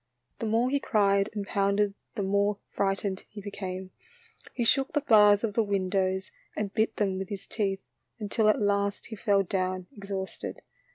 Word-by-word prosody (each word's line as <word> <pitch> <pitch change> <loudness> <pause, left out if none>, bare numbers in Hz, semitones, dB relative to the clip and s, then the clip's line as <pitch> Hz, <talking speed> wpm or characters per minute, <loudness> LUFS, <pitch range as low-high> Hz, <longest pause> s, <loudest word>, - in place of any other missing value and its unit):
The 225 - -2
more 230 +4 +2
he 280 - +2
cried 200 -4 +2
and 205 -1 -2
pounded 200 +1 +1 0.2
the 205 - -1
more 200 +1 +2
frightened 195 0 -1
he 210 - -9
became. 190 -2 -6 0.6
He 240 - -2
shook 270 +3 +2
the 295 - +2
bars 210 -5 +6
of 220 -3 0
the 230 - +3
windows 190 -2 0 0.3
and 205 -1 -2
bit 220 0 +1
them 195 -3 0
with 190 - -5
his 195 -1 -5
teeth, 195 -3 -2 0.3
until 215 0 +1
at 215 - +3
last 200 -1 0
he 220 - -7
fell 200 -2 +2
down 185 0 -1
exhausted. 195 -2 -5
200 Hz, 170 wpm, -28 LUFS, 195-215 Hz, 0.6 s, bars